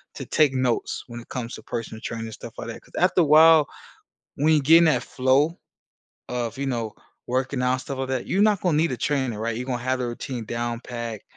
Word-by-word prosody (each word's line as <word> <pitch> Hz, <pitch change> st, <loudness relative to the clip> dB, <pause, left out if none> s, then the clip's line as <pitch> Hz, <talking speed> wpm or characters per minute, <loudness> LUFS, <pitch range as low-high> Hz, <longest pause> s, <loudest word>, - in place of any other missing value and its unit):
to -, -, -6 dB
take 150 Hz, -3 st, +3 dB
notes 130 Hz, -2 st, -1 dB
when 120 Hz, -1 st, -8 dB
it 115 Hz, -, -14 dB
comes 120 Hz, -2 st, -5 dB
to -, -, -12 dB
personal 110 Hz, -1 st, -5 dB
training, 115 Hz, -1 st, -4 dB
and 110 Hz, -, -8 dB
stuff -, -, -10 dB
like -, -, -6 dB
that. -, -, -7 dB
'Cause -, -, -23 dB
after 180 Hz, 0 st, +3 dB
a -, -, +5 dB
while, 155 Hz, 0 st, +7 dB, 0.7 s
when 155 Hz, +3 st, +3 dB
you're 150 Hz, -, +4 dB
getting 165 Hz, +4 st, +6 dB
that 155 Hz, -, +2 dB
flow 135 Hz, +6 st, +1 dB, 0.7 s
of, 120 Hz, -1 st, -3 dB
you 140 Hz, -, -2 dB
know, 115 Hz, -4 st, -2 dB, 0.4 s
working 130 Hz, +1 st, -1 dB
out 125 Hz, 0 st, +1 dB
stuff 135 Hz, -1 st, -6 dB
like 130 Hz, 0 st, -3 dB
that, 130 Hz, -2 st, -2 dB
you're 195 Hz, -, +1 dB
not 210 Hz, -3 st, +3 dB
gonna 175 Hz, -4 st, +1 dB
need 160 Hz, -1 st, +2 dB
a 125 Hz, -, -3 dB
trainer, 130 Hz, -5 st, -1 dB
right? 115 Hz, +1 st, -2 dB
You're 125 Hz, -, -4 dB
gonna 125 Hz, -2 st, -2 dB
have 130 Hz, 0 st, 0 dB
a 125 Hz, -, -1 dB
routine 120 Hz, 0 st, -5 dB
down 120 Hz, +1 st, -3 dB
pat, 115 Hz, -4 st, -6 dB
130 Hz, 230 wpm, -24 LUFS, 120-150 Hz, 0.7 s, while